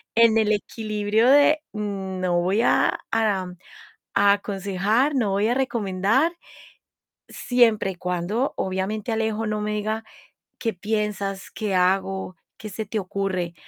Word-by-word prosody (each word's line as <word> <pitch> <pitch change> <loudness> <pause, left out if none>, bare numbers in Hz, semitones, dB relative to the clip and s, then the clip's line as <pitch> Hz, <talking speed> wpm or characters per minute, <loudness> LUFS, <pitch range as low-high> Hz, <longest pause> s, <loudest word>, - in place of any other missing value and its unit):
en 230 -1 +5
el 215 -1 +3
equilibrio 215 +1 0
de: 290 +2 +5
"No 190 -4 -2
voy 190 +5 +1
a, - - +2
a 200 -5 0 0.8
aconsejar, 200 +7 0
no 225 -6 +1
voy 200 +3 +1
a 240 - +2
recomendar". 235 - +1 1.0
Siempre 230 -6 +2
y - - -14
cuando, 180 +9 -2
obviamente, 190 +4 -2
Alejo 220 0 -1
no 215 0 -2
me 210 0 -2
diga: 215 +1 -2 0.5
"¿Qué 225 - -1
piensas? 205 -1 -3
¿Qué 210 -3 -3
hago, 190 0 0 0.2
qué 215 - -7
se 215 +2 -5
te 215 +2 -3
ocurre?". 185 -2 -3
210 Hz, 125 wpm, -24 LUFS, 190-225 Hz, 1.0 s, en